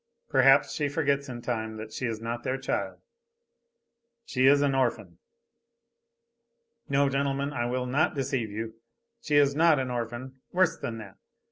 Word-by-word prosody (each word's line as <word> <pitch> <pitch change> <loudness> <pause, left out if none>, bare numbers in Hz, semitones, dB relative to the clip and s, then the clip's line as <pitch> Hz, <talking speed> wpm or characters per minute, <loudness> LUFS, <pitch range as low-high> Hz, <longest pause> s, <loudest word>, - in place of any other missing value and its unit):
Perhaps - - +5
she 145 -2 -1
forgets 140 -2 0
in 120 -1 -7
time 110 -3 -3
that 110 0 -8
she 125 - -2
is 110 -1 -3
not 115 +1 -4
their 130 +2 -2
child. 135 - -3 1.3
She 130 -1 +2
is 145 +1 +5
an 140 -1 +2
orphan. 130 -3 -1 1.7
No, 140 0 +3
gentlemen, 140 +1 -1
I 120 -3 -1
will 125 +1 -2
not 140 +6 +1
deceive 135 -4 -1
you, 110 +2 -5 0.5
she 150 - -1
is 140 -1 +5
not 160 0 +5
an 130 -1 -2
orphan. 120 +2 -5
Worse 180 -2 +3
than 115 - -5
that. 100 -4 -11
130 Hz, 155 wpm, -28 LUFS, 120-140 Hz, 1.7 s, Perhaps